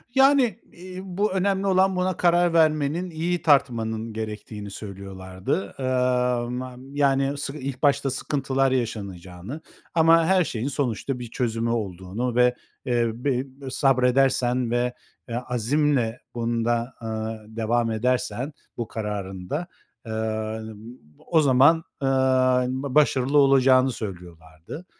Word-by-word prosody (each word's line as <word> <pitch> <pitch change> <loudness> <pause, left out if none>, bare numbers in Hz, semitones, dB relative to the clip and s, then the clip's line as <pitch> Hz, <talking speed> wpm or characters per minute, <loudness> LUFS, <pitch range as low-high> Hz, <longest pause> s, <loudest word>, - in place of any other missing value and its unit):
Yani, 270 -5 +4
iii, 185 +1 -9
bu 195 +3 -1
önemli 195 +1 0
olan 190 0 +3
buna 180 -1 0
karar 175 -1 +3
vermenin, 155 +2 +2
iyi 170 +2 -2
tartmanın 115 -6 +1
gerektiğini 105 -1 -6
söylüyorlardı. 95 -1 -5
Iıı, 125 -2 +1
ma 125 0 -5 0.2
yani, 140 0 +2
sık 140 0 -4
ilk 135 -2 -6
başta 140 -1 +3
sıkıntılar 135 0 0
yaşanacağını 100 - -4 0.3
ama 165 0 +5
her 185 +1 +4
şeyin 125 -5 -3
sonuçta 135 -2 -2
bir 120 -2 -7
çözümü 115 -2 -1
olduğunu 105 +2 -3
ve, 125 0 +4 0.3
eee, 120 -2 +1
be 125 +1 -1 0.3
sabredersen 130 -2 +2
ve, 120 0 0 0.4
eee, 115 - -3
azimle 125 0 0 0.2
bunda, 120 +1 -1
aaa, 110 -1 -4
devam 115 +1 0
edersen 125 +3 -1 0.2
bu 120 - -3
kararında, 105 - -4 0.4
ııı, 110 0 -3 0.5
o 160 -2 +4
zaman, 140 +4 +5 0.2
ııı, 130 -1 +3
ba 130 +1 -4
başarılı 140 -2 +3
olacağını 135 -2 +5
söylüyorlardı. 85 - -9
125 Hz, 115 wpm, -24 LUFS, 110-145 Hz, 0.5 s, ama